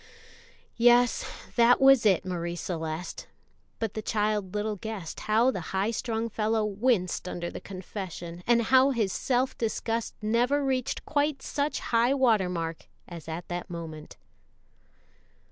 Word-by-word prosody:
"Yes, 240 +1 +5 0.3
that 235 +1 +6
was 270 -4 +6
it, 190 -2 +3
Marie 175 -2 -3
Celeste;" 165 -1 -5 0.5
but 225 -3 -3
the 215 - -4
child 210 -3 -1
little 210 0 -1
guessed 205 -5 -6
how 225 +4 +3
the 190 - -4 0.2
high 200 +4 +1
strung 230 0 -2
fellow 220 0 0
winced 205 -4 0
under 175 -1 -4
the - - -7
confession, 185 -3 -7
and 235 -1 +4
how 260 +3 +5
his 220 -8 0
self 255 0 0
disgust 225 0 -2
never 245 +6 +1
reached 260 -2 -1
quite 290 -1 0
such 290 0 -2
high 235 +4 +4
water 225 -9 +3
mark 165 -2 -4 0.2
as 170 -3 -9
at 165 +2 -5
that 175 +1 -4
moment. 160 -3 -8
215 Hz, 140 wpm, -28 LUFS, 180-240 Hz, 0.5 s, that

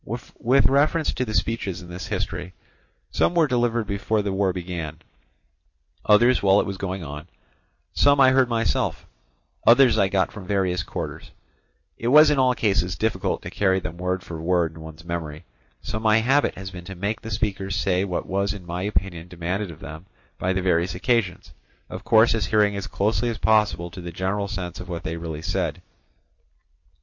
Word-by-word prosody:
With 125 +3 0
reference 150 +4 +2
to 130 - -2
the 110 -2 -4
speeches 100 -4 -2
in - - -11
this 90 +4 -7
history, 95 -5 -4 0.6
some 175 - +1
were 165 -2 +5
delivered 120 -4 0
before 100 +2 -1
the 100 -1 -2
war 95 -1 +1
began, 85 -4 -5 1.1
others 120 +4 +4
while 100 0 +5
it - - +1
was 100 -1 -5
going 95 -1 -4
on; 75 +2 -8 0.7
some 140 0 +4
I 130 -1 +7
heard 130 -1 +3
myself, 115 -1 -1 0.6
others 120 -1 +6
I 100 - +4
got 95 -1 0
from 100 -4 -10
various 95 -3 0
quarters; - - -6 0.7
it 115 - -3
was 150 +4 +7
in 145 - +2
all 130 -1 +3
cases 95 -5 0
difficult 95 0 -1
to 85 - -7
carry 95 -1 +2
them 85 -1 -7
word 90 0 -2
for 80 -2 -7
word 85 -1 +1
in 80 - -12
one's 80 +1 -11
memory, 85 -2 -5 0.4
so 110 - -3
my 110 -1 +3
habit 135 +6 +2
has 95 0 -7
been 90 -1 -9
to 95 - -8
make 105 +5 -3
the 115 - -7
speakers 100 -3 -2
say 95 -2 +1
what 90 -3 -3
was 100 +1 -1
in 95 -3 -10
my 85 +1 -4
opinion 90 -3 -2
demanded 90 +3 -3
of 80 -1 -11
them 80 +3 -9 0.3
by 95 - 0
the 95 0 -1
various 90 -1 +1
occasions, 105 -2 -1 0.4
of - - -7
course 110 +1 +5
adhering 105 -1 +2
as 100 - -4
closely 110 +4 0
as 115 - -3
possible 105 -6 +2
to 90 - -9
the 85 0 -7
general 95 +4 -2
sense 90 -4 -5
of 95 - -9
what 85 -1 -5
they 80 - -3
really 80 -2 -6
said. 90 - -2
95 Hz, 185 wpm, -24 LUFS, 90-110 Hz, 1.1 s, I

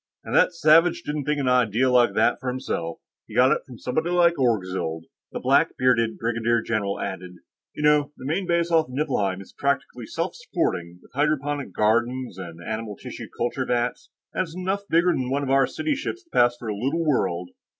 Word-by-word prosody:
"And - - -6
that - - +5
savage 165 +2 +4
didn't 150 -1 -3
think 150 0 0
an 135 - -1
idea 125 -1 +3
like 120 -5 +4
that 115 +2 +4
up - - -19
for 130 - -3
himself; 125 -10 -3 0.3
he - - -11
got 130 +2 +5
it - - +2
from 125 -3 -11
somebody 155 +9 -2
like 175 -1 +4
Orgzild," 95 -9 0 0.3
the - - -4
black - - +2
bearded 115 -3 +2
brigadier 115 0 0
general 105 -3 -1
added. 90 -2 -5 0.4
"You 150 - -4
know, 150 -1 +4
the - - -10
main 175 +6 -1
base 170 0 +1
off 160 -1 +3
Niflheim 125 -9 -1
is 100 - -14
practically 135 -4 -2
self - - -3
supporting, 85 0 -2
with - - -21
hydroponic 145 0 0
gardens 120 0 0
and 85 -2 -8
animal 110 -1 -4
tissue - - -8
culture 120 +3 -1
vats. 120 0 -1 0.2
And - - 0
it's 170 -3 -5
enough 190 +2 -2
bigger 170 +2 +4
than 130 -4 -2
one 140 +2 0
of 135 - -3
the 135 0 +4
City 310 -1 -2
ships 345 +6 -4
to 335 - -37
pass 120 0 +3
for 120 - -8
a 105 - -2
little 140 +10 -1
world. 90 - 0
125 Hz, 200 wpm, -24 LUFS, 110-150 Hz, 0.4 s, that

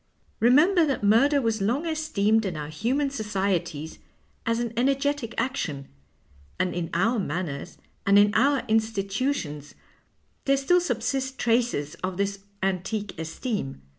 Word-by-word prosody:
Remember 310 - +5
that 270 -6 -1
murder 265 +8 +5
was 225 -2 0
long 245 +11 0
esteemed 225 -10 +1
in 185 -6 -3
our 150 -1 -5
human 260 - 0
societies 190 - -2 0.5
as 230 0 +2
an 235 -1 -2
energetic 275 0 0
action, 200 - -2 0.7
and 185 -1 +1
in 175 -2 -3
our 225 +7 +2
manners 155 -5 -4 0.3
and 200 0 +5
in 205 0 +5
our 275 +4 +3
institutions 210 - -1 0.7
there 275 0 +3
still 355 +7 +3
subsist 265 -2 -2
traces 230 -12 +1
of 185 -1 -2
this 200 0 -1 0.2
antique 195 +3 -2
esteem. 160 - -4
220 Hz, 130 wpm, -26 LUFS, 185-265 Hz, 0.7 s, Remember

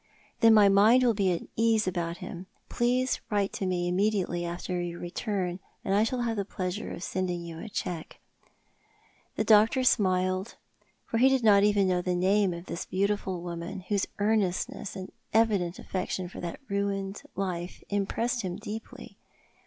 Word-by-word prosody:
" - - -33
Then 225 -1 +7
my 210 -2 +7
mind 210 +6 +6
will 240 -2 +4
be 195 -3 +1
at 170 - -2
ease 225 -1 +3
about 170 -2 -2
him. 185 0 -8 0.2
Please 250 +2 +1
write 205 -2 0
to 190 - -2
me 175 -1 0
immediately 185 -2 0
after 175 +1 -3
your 175 0 -5
return, 180 0 -3 0.3
and 195 - +1
I 205 +2 +4
shall 245 +2 -1
have 230 -2 -1
the 200 - 0
pleasure 185 0 -4
of 175 - -7
sending 180 -2 -2
you 165 -1 -8
a 220 - -7
cheque." 175 -5 -4 1.2
The - - 0
doctor 220 +4 +5
smiled, 185 -3 +2 0.5
for 225 - -1
he 260 +2 +6
did 265 -2 +2
not 205 -2 +7
know 205 - +5
even 200 -2 +2 0.2
the 180 0 0
name 190 +2 +3
of 170 0 -7
this 170 - -5
beautiful 190 -2 -1
woman, 175 +3 -5
whose 200 -2 +1
earnestness 205 -2 0
and 190 -1 -7 0.2
evident 200 -6 +2
affection 185 -1 -3
for - - -9
that 170 -1 -5
ruined 200 -1 -2
life 180 -2 -4
impressed 225 +5 -1
him 180 -3 -3
deeply. 220 +4 -8
195 Hz, 170 wpm, -28 LUFS, 180-215 Hz, 1.2 s, Then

